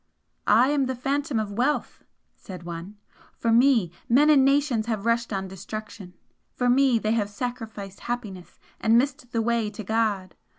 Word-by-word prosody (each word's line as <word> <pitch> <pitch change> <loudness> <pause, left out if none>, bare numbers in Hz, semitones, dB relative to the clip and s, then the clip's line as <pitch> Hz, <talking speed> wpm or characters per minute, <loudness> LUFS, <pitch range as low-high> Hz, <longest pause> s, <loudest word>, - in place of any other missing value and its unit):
"I 235 +6 +5
am 285 -2 +1
the 260 - -2
Phantom 275 +1 -1
of 210 -2 -3
Wealth" 250 +8 -1 0.3
said 185 -2 -10
one 170 +4 -8 0.4
"For 230 - 0
me 235 -6 +4 0.2
men 290 +6 +5
and 275 -3 +6
nations 275 -5 +2
have 220 -3 -2
rushed 230 0 +1
on 195 -1 -2
destruction, 190 0 -8 0.4
for 245 -1 +2
me 260 -1 +4
they 215 -1 -1
have 215 -3 0
sacrificed 220 -3 -6
happiness 210 -7 -6 0.2
and 225 +1 +4
missed 255 -1 -1
the 230 -2 0
way 230 -2 0
to 210 +1 -8
God! 205 -3 -1
230 Hz, 165 wpm, -25 LUFS, 205-250 Hz, 0.4 s, and